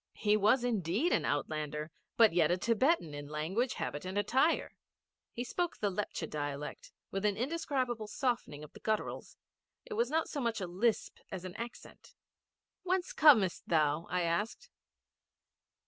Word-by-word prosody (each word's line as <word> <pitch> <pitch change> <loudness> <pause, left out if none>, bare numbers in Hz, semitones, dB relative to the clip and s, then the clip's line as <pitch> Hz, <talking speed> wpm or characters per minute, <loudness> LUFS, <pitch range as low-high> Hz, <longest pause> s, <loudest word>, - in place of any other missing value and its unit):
He 210 0 +3
was 215 +5 +4
indeed 220 - +1
an - - +1
outlander, 150 +1 -2 0.3
but 225 -6 +6
yet 165 -3 +4
a 175 - +2
Thibetan 230 - +2
in 145 0 -6
language, 170 - -1
habit, 145 - -4
and 185 +2 -4
attire. 260 +10 +2 0.6
He 240 - -4
spoke 350 +6 -2
the 205 -2 0
Lepcha 185 -4 -3
dialect 145 -1 -5 0.2
with 195 +1 -2
an 205 -2 +1
indescribable 255 -4 -1
softening 235 - -2
of 150 - -12
the - - -12
gutturals. 215 -1 -3 0.5
It - - -6
was 465 +3 +1
not 320 +1 +1
so 290 - -4
much 230 -2 0
a 190 - -2
lisp 195 +6 0
as 185 -1 -6
an 185 0 -7
accent. 235 +1 -9 0.7
'Whence 370 0 -1
comest 225 - +5
thou?' 155 0 +2
I 180 0 0
asked. 205 - -2
210 Hz, 155 wpm, -33 LUFS, 165-245 Hz, 0.7 s, but